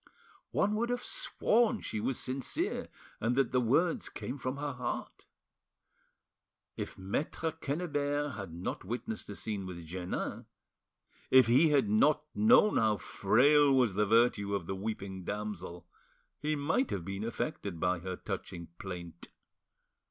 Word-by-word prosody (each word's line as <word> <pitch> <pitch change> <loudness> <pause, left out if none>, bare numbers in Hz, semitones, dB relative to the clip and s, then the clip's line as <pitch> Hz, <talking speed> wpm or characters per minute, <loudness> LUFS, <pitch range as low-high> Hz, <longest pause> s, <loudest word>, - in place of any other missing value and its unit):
One 210 - +1
would 235 +2 0
have 245 0 -1
sworn 230 0 +1
she 110 - -3
was 125 +4 -1
sincere 130 0 -2 0.3
and 115 +2 +1
that 135 -2 +2
the 125 - +3
words 150 +9 +2
came 135 +3 -6
from 130 +2 -3
her 145 0 -2
heart. 125 -2 -5 1.5
If - - -5
Maitre 145 - -2
Quennebert 145 -2 -1
had 100 -6 -6
not 85 +3 -4
witnessed 110 +2 -5
the 100 - -7
scene 100 -3 -4
with 85 -2 -7
Jeannin, 90 +2 -4 0.8
if 130 -1 +7
he 130 +8 +5
had 140 -6 +3
not 145 +9 +4
known 215 -1 +5
how 110 -2 +3
frail 145 +8 +4
was 125 -6 +3
the 105 +2 +1
virtue 110 -2 +3
of 95 -4 -3
the 95 - -3
weeping 95 -2 -5
damsel, 95 -4 -5 0.5
he 155 +1 0
might 160 - +1
have 90 -4 -3
been 100 +2 -4
affected 105 - -3
by 90 0 +1
her 90 +1 -4
touching 85 -1 -6
plaint. 85 -3 -7
115 Hz, 145 wpm, -32 LUFS, 95-145 Hz, 1.5 s, if